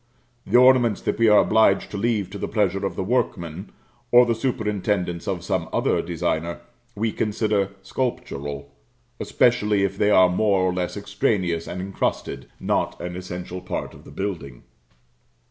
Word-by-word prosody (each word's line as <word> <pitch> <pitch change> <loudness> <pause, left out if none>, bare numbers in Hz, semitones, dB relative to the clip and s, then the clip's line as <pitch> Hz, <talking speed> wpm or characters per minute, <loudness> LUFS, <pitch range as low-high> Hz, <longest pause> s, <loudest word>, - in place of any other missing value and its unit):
The - - +4
ornaments 125 -4 +5
that - - -2
we 115 - +5
are 105 - +6
obliged 110 -3 +3
to 105 - -4
leave 105 -3 -1
to 100 - -7
the - - -3
pleasure 100 -3 0
of 100 - -2
the - - -2
workman, 95 -6 -2 0.4
or 125 0 +7
the 120 - +1
superintendence 105 -7 -2
of - - -2
some - - -2
other - - +1
designer, 85 0 -2 0.3
we 110 +2 -1
consider 105 -2 0
sculptural, 70 - -4 0.5
especially 105 -4 +2
if 95 0 -2
they 105 - +3
are 95 -3 +6
more 95 +1 +2
or 90 -1 +1
less 90 +2 -3
extraneous 95 -4 -1
and 90 - -5
incrusted 95 +1 -3
not - - -1
an 90 +1 -5
essential 90 0 -6
part 90 - -5
of - - -15
the - - -14
building. 85 -11 -5
100 Hz, 160 wpm, -23 LUFS, 90-110 Hz, 0.5 s, or